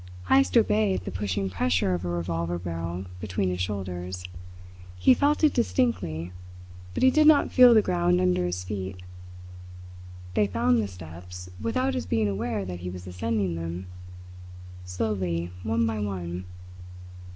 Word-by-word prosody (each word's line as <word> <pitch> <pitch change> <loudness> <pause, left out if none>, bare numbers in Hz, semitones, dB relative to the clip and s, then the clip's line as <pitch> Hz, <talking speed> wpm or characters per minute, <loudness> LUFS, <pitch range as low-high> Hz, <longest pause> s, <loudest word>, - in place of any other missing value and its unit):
Heyst 90 0 +4
obeyed 100 -3 +2
the - - -4
pushing 95 0 -2
pressure 90 0 +1
of 90 0 -2
a 90 - -2
revolver 85 0 -2
barrel 85 +1 -4
between 95 -1 -1
his 90 0 -3
shoulders. 90 -2 -4 0.7
He 90 - +6
felt 290 +4 +1
it 305 - +5
distinctly, 90 - 0 0.6
but - - 0
he 260 - +7
did 305 +2 +5
not 305 -2 +5
feel 250 -2 +8
the 215 - +6
ground 90 0 +2
under 90 0 +2
his 90 +1 -2
feet. 95 -1 -5 1.3
They 105 - +2
found 120 +4 +2
the 105 - -2
steps, 90 0 -10
without 255 - 0
his 255 - -3
being 110 -2 +1
aware 105 +1 -2
that 90 -1 -6
he 90 0 -5
was 90 0 -8
ascending 95 0 -1
them 85 +2 -5 1.0
slowly, 90 -3 -2
one 115 +3 +1
by 110 -1 -1
one. 90 -3 -4
90 Hz, 150 wpm, -26 LUFS, 90-110 Hz, 1.3 s, feel